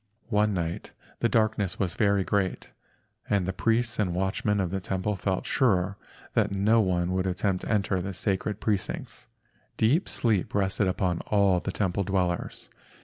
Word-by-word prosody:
One 105 -1 +2
night 85 -1 -3 0.3
the 115 - +2
darkness 110 -4 +1
was 95 -3 -1
very 100 -3 +2
great, 95 -1 -1 0.6
and 100 -3 +2
the 95 - -2
priests 115 +5 0
and 90 -5 0
watchmen 95 +2 0
of 90 -3 -1
the 95 - -1
temple 95 +1 -2
felt 95 0 -2
sure 100 -6 +2 0.4
that - - +2
no 110 +4 +4
one 90 -2 0
would 95 0 0
attempt 95 0 0
to - - -3
enter 100 -3 +1
the 95 +1 -5
sacred 100 +2 -1
precincts. 105 -2 -3 0.5
Deep 135 - +2
sleep 110 -7 0
rested 95 0 +1
upon 90 -2 0
all 100 -3 +3
the 95 - -4
temple 100 0 -1
dwellers. 90 -2 -2
95 Hz, 160 wpm, -27 LUFS, 95-105 Hz, 0.6 s, no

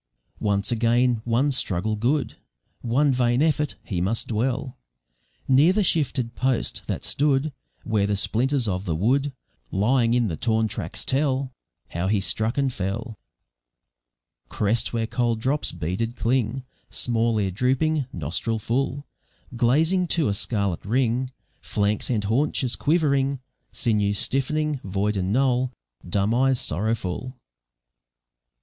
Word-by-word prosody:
Once 100 0 0
again, 120 0 +2
one 120 +5 +2
struggle 110 -4 0
good, 120 +2 0 0.5
One 135 +5 +2
vain 125 +1 +2
effort; 150 -2 +1
he 90 -5 -3
must 105 +6 -1
dwell 125 +3 -1 0.7
Near 140 +7 +5
the 210 +1 +2
shifted 130 -9 +1
post, 130 -2 -1
that - - -3
stood 145 0 +1 0.3
Where 105 -3 +1
the 105 - +1
splinters 125 +5 +1
of 95 0 -2
the 80 - -1
wood, 135 - +1 0.4
Lying 115 +4 +2
in 120 -2 +2
the 85 - -2
torn 110 -1 +1
tracks, - - -6
tell 135 -1 0 0.4
How 85 +2 -2
he 105 +1 +2
struck 110 +5 -1
and 135 -2 +1
fell. 105 +3 -4 1.3
Crest 105 +2 0
where 115 -1 -1
cold 115 -1 0
drops 135 +6 +1
beaded 90 +8 -3
cling, 125 +1 0 0.3
Small 115 -1 0
ear 100 -3 0
drooping, 130 - +1
nostril 85 +8 -2
full, 135 +6 -1 0.5
Glazing 160 +10 +2
to 160 -8 +2
a - - +1
scarlet 100 -3 -1
ring, 125 +3 +1 0.3
Flanks 105 +1 -1
and 110 -5 0
haunches 125 +3 0
quivering, 140 -4 +1 0.3
Sinews 105 -3 +1
stiff'ning, 150 +4 0
void 100 +2 -1
and 95 0 -1
null, 130 +1 +2 0.4
Dumb 100 +4 +1
eyes 130 +1 +3
sorrowful. 110 - -2
120 Hz, 130 wpm, -24 LUFS, 105-135 Hz, 1.3 s, Near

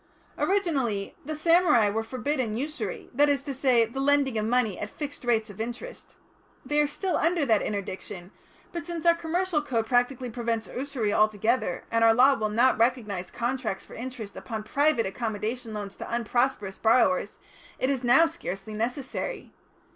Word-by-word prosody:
"Originally 275 - 0
the 310 +2 -4
samurai 320 - +4
were 220 +2 -1
forbidden 255 -1 -2
usury, 310 - -4
that 290 +3 +4
is 280 -1 +1
to 280 -1 -4
say 250 -3 +3
the 235 +4 -7
lending 280 -2 +2
of 215 - 0
money 230 -3 +1
at 210 - -4
fixed 285 +1 -7
rates 225 -3 +1
of 205 - -7
interest. 240 - -7 0.5
They 295 +3 +2
are 295 - +2
still 365 +5 -1
under 330 -2 +2
that 220 -5 +3
interdiction, 190 -2 -5 0.4
but 340 -2 -6
since 340 -2 -5
our 340 - +7
commercial 335 0 -1
code 240 -6 -1
practically 245 +1 +1
prevents 230 -1 -2
usury 255 -6 -2
altogether, 215 -1 +1
and 230 0 +2
our 225 0 +6
law 260 +4 +6
will 215 -5 -1
not 235 +2 +3
recognise 220 -6 0
contracts 240 -4 -3
for - - -14
interest 240 -4 -7
upon 220 -3 -5
private 280 +1 +2
accommodation 220 +3 -3
loans 205 -2 -6
to - - -7
unprosperous 235 -3 0
borrowers, 255 +5 +3 0.4
it 260 - +1
is 265 -2 -2
now 245 +7 +6
scarcely 215 - -6
necessary. 250 - -4
245 Hz, 165 wpm, -27 LUFS, 220-285 Hz, 0.5 s, our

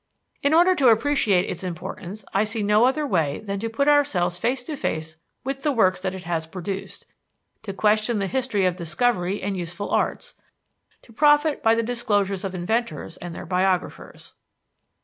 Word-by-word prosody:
In 280 - +2
order 355 +3 +6
to 280 -7 +3
appreciate 225 -5 +3
its 180 - -4
importance, 185 +3 -6
I 195 - +3
see 215 0 -2
no 210 +3 +4
other 295 +4 +1
way 160 - 0
than 200 -2 -5
to 225 +2 -3
put 280 +6 0
ourselves 240 -13 +2
face 245 +5 -1
to 305 +3 -5
face 160 - -3 0.3
with 270 +1 -4
the 295 - +1
works 185 -8 +2
that 190 0 -3
it 185 - -8
has 165 -1 -2
produced, 190 +3 -6 0.6
to 215 - -6
question 215 +3 +1
the 200 - 0
history 235 -3 0
of 180 -1 +1
discovery 185 +2 -1
and 200 0 -2
useful 175 +2 -5
arts, - - -1 0.7
to 230 - -18
profit 295 +3 +3
by 225 -2 +4
the 230 - 0
disclosures 205 -5 0
of 190 -1 -4
inventors 180 -3 -2
and 175 -1 -8
their - - -7
biographers. 185 +1 -2
205 Hz, 175 wpm, -23 LUFS, 185-245 Hz, 0.7 s, order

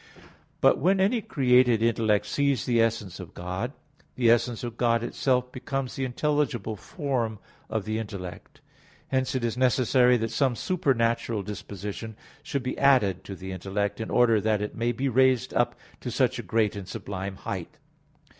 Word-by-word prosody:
But - - +5
when 190 +2 +3
any 215 +5 +2
created 125 - +3
intellect 110 -3 +2
sees 140 -4 0
the 120 -2 +3
essence 110 -5 -1
of 90 -2 -10
God, 90 +8 -4 0.4
the 120 -2 +4
essence 120 0 +1
of 120 -2 -5
God 115 -1 +2
itself 125 0 0
becomes 130 0 -4
the 135 - -1
intelligible 130 -5 -1
form 125 - -2 0.3
of 110 -3 -2
the 110 0 -1
intellect. 100 -5 -8 0.5
Hence 130 0 0
it 130 - -1
is 115 -1 0
necessary 125 0 +4
that 115 -1 -2
some 130 +1 +1
supernatural 115 - 0
disposition 105 +2 -6 0.3
should 140 -3 -3
be 130 - -3
added 125 -10 +4
to 95 - -6
the 95 0 -7
intellect 100 +3 -2
in 110 - -4
order 115 -3 +4
that 110 0 +1
it 105 0 -4
may 120 +1 0
be 130 +4 -2
raised 130 -1 +3
up - - +1 0.2
to - - -5
such - - +1
a - - -1
great 110 -2 +1
and 100 -3 -7
sublime 95 0 -5
height. - - -6
115 Hz, 165 wpm, -27 LUFS, 105-130 Hz, 0.5 s, But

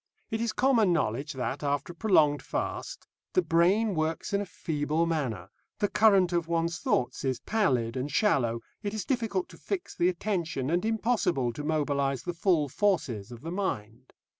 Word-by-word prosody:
It 225 - -1
is 235 -1 0
common 240 -7 +3
knowledge 140 -3 0
that, 130 +1 -3
after 145 +3 -1
a - - -26
prolonged 155 -8 +3
fast, - - -4 0.3
the 370 - +3
brain 195 +6 +3
works 160 +4 -2
in 200 - +2
a 200 - -5
feeble 155 0 -1
manner, 125 - -2 0.3
the 205 - +1
current 195 -5 +4
of 170 -2 0
one's 170 0 0
thoughts 125 0 0
is 130 -3 0
pallid 130 - +1
and 130 +3 -3
shallow, 120 - +2 0.2
it 205 0 -3
is 210 - -3
difficult 225 -8 -1
to - - -13
fix 390 -3 -4
the 175 - +3
attention 170 -7 -2
and 175 +4 +1
impossible 210 - +1
to 145 - -6
mobilise 140 -4 0
the 175 - -3
full 170 -3 +2
forces 135 - 0
of 120 -1 -9
the 165 - -5
mind. 125 - -4
165 Hz, 175 wpm, -28 LUFS, 135-200 Hz, 0.3 s, current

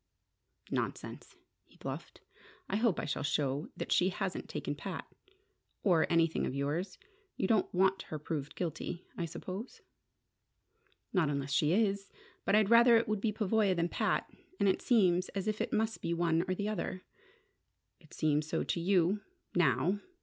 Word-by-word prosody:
"Nonsense," - - -4 0.3
he - - -23
bluffed. - - -7 0.5
"I 195 - 0
hope 220 -4 +2
I - - -2
shall 145 - -2
show 145 0 0
that - - -4
she 180 - +4
hasn't 190 0 -3
taken - - -3
Pat - - -5 0.8
or 175 -6 +4
anything 165 -1 +2
of 130 - -4
yours. 150 +7 -2 0.4
You 190 - +1
don't 220 -1 +2
want 190 +1 +3
her 155 - -3
proved 150 -1 -4
guilty, 170 +1 -4
I 170 - -2
suppose?" 185 +8 -7 1.3
"Not 175 -7 +3
unless 140 -1 -2
she 150 +1 +3
is. 200 -1 +1 0.4
But 200 - +3
I'd 215 0 +4
rather 235 0 +8
it 225 - +1
would 215 -1 -1
be 220 - +1
Pavoya 210 -2 +2
than 170 0 0
Pat. - - 0 0.3
And 200 - +3
it 190 - +2
seems 185 -6 +3
as 195 +1 -2
if 215 0 -1
it - - -2
must 220 +1 0
be 170 - -1
one 170 0 +2
or 185 - 0
the 205 +2 -2
other." 185 -3 -3 1.0
"It 155 -3 -21
seems 150 0 +1
so - - 0
to - - -1
you 185 +2 +2 0.3
now. 170 - +2
185 Hz, 165 wpm, -32 LUFS, 160-205 Hz, 1.3 s, rather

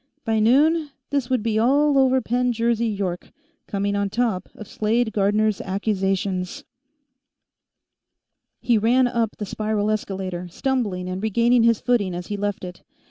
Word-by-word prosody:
By 225 -1 +1
noon, 295 +8 +3 0.2
this 275 -3 -1
would 255 -4 0
be 220 -1 0
all 285 +5 +3
over 260 -1 +3
Penn 245 +1 0
Jersey 235 0 0
York; 195 -4 -3 0.4
coming 200 0 -1
on 200 0 0
top 210 -4 -1
of 215 - -10
Slade 220 +1 0
Gardner's 210 0 +1
accusations 190 -2 -2 2.0
He 235 -3 +2
ran 245 +4 +3
up 235 -3 -1
the 210 - -4
spiral 215 +1 -1
escalator, 190 -4 -4
stumbling 205 -3 -2
and 185 +1 -4
regaining 235 +3 +3
his 230 -1 +3
footing 210 -7 +1
as 175 0 -5
he 205 - -2
left 205 -1 -3
it. 180 -1 -8
215 Hz, 145 wpm, -23 LUFS, 195-240 Hz, 2.0 s, noon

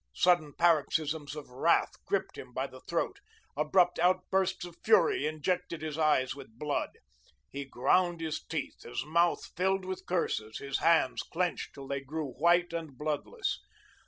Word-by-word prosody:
Sudden 175 -5 +3
paroxysms 155 -2 +2
of 150 -4 -9
wrath 125 - +2
gripped - - -1
him - - -10
by - - -1
the - - -10
throat; - - -2 0.4
abrupt 170 +5 +3
outbursts 185 +1 +2
of 175 -1 -10
fury 435 - +4
injected 170 +2 -2
his 155 -2 -3
eyes 150 -5 +2
with 130 -5 -12
blood. 150 +1 -2 0.5
He 140 0 -5
ground 175 +7 +2
his 160 -2 -3
teeth, 160 -3 -4
his 120 +2 -4
mouth 170 +3 +2
filled 190 +1 +1
with 190 0 -5
curses, 110 -11 -1
his 140 -1 -2
hands 165 -6 +3
clenched 175 +1 -2
till 135 -1 -9
they 140 0 -2
grew 145 +1 -4
white 170 +6 +3
and 160 -6 -5
bloodless. 155 - -2
160 Hz, 155 wpm, -31 LUFS, 145-180 Hz, 0.5 s, fury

